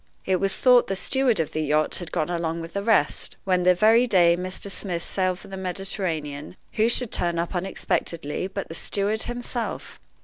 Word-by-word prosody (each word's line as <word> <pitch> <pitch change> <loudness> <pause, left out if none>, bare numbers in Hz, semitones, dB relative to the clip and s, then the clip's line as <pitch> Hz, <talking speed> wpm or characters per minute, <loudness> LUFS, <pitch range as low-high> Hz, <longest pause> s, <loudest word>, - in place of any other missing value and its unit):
It 190 -1 +2
was 195 -1 0
thought 250 -2 +5
the 195 - -1
steward 250 +1 +1
of 160 - -1
the 155 - -2
yacht 155 0 +1
had 175 -3 -8
gone 155 +3 -1
along 170 -1 -2
with 165 0 -8
the 200 - -1
rest, 205 -8 +1
when, 185 -2 +2
the 180 0 +4
very 225 +6 +5
day 175 -5 +5
Mr. 185 +2 -4
Smith 175 -4 -3
sailed 185 -1 -1
for - - -13
the 195 - -7
Mediterranean, 180 -5 -3 0.2
who 220 +2 +2
should 240 -1 -1
turn 170 -1 -1
up 170 +2 -2
unexpectedly 175 -3 -2
but 195 0 -5
the - - -8
steward 205 +5 0
himself! 240 -1 -4
185 Hz, 195 wpm, -24 LUFS, 170-205 Hz, 0.2 s, thought